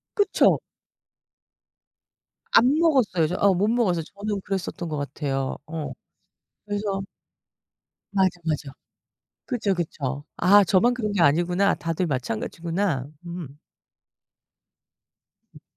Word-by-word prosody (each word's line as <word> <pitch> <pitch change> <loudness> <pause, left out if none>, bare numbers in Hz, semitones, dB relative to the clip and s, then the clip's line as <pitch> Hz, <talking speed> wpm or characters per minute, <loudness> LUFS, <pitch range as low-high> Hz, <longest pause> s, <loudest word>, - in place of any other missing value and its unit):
그쵸. 410 -2 +3 1.9
안 245 - +6
먹었어요. 255 - +3
저 175 - -3
어 200 -1 +5
못 190 +3 +1
먹었어요. 205 -8 +1
저는 200 +4 -4
그랬었던 185 -3 -4
것 155 - -3
같아요. 140 -1 -2
어. 155 -1 -5 0.7
그래서 205 -1 -2 1.1
맞아, 190 -2 +3 0.2
맞아. 150 -3 -2 0.7
그쵸, 215 -6 0
그쵸. 145 -5 -3
아 200 +3 +6
저만 195 +6 +3
그런 220 -4 -2
게 200 - +1
아니구나. 175 +6 +3
다들 165 +2 -2
마찬가지구나. 160 - -2 0.2
음. 170 -5 -7 2.0
음. - - -15
180 Hz, 215 characters per minute, -24 LUFS, 155-205 Hz, 2.0 s, 안